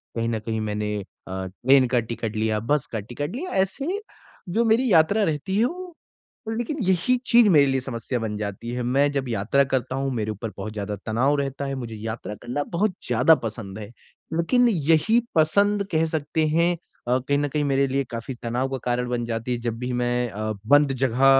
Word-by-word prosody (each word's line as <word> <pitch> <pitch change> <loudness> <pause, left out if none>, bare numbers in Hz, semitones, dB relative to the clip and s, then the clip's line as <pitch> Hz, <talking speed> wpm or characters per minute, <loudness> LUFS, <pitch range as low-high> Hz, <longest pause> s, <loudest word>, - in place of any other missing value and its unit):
कहीं 115 0 -1
न 110 -2 -1
कहीं 110 0 -3
मैंने 105 0 -2
अ, 95 0 -8
ट्रेन 130 +7 +3
का 120 0 +2
टिकट 115 -1 -4
लिया 110 0 0
बस 140 +5 0
का 110 - -2
टिकट 145 - -5
लिया 360 +7 -4
ऐसे 335 - -4 0.5
जो 225 +6 +1
मेरी 230 +1 +3
यात्रा 200 +7 +4
रहती 165 +4 -1
है 225 - +4
वो 365 +7 -4 0.7
लेकिन 265 +6 -2
यही 190 +7 +2
चीज़ 235 -3 +6
मेरे 150 -6 +6
लिए 135 0 +1
समस्या 125 -1 -3
बन 110 -2 -3
जाती 105 +2 -5
है। 125 - -2
मैं 140 +4 +2
जब 135 -2 -2
यात्रा 115 +5 +2
करता 130 0 0
हूँ 135 0 -1
मेरे 110 -2 -1
ऊपर 105 +1 -5
बहुत 105 +2 -5
ज़्यादा 105 0 -3
तनाव 125 +6 +2
रहता 140 0 -3
है 135 0 -3
मुझे 120 -4 -6
यात्रा 110 0 -5
करना 125 +6 -3
बहुत 205 +3 +2 0.2
ज़्यादा 160 - +5
पसंद 105 -2 -5
है। 105 +1 -8 0.4
लेकिन 240 +10 +3
यही 165 +6 +3 0.2
पसंद 200 +6 +3
कह 160 0 +2
सकते 155 0 -1
हैं 170 +3 +3 0.3
अ, 125 +1 +3
कहीं 140 +2 0
न 145 - 0
कहीं 150 +1 0
मेरे 140 0 +2
लिए 135 +1 0
काफ़ी 115 +3 -5
तनाव 120 +3 -1
का 135 - -2
कारण 125 0 0
बन 120 -1 -1
जाती 115 +1 -3
है - - -1
जब 115 -1 -2
भी 125 +1 -3
मैं 120 0 0
अ, 110 +1 -3
बंद 145 +1 +5
जगह 130 +1 +2
130 Hz, 205 wpm, -24 LUFS, 115-160 Hz, 0.7 s, चीज़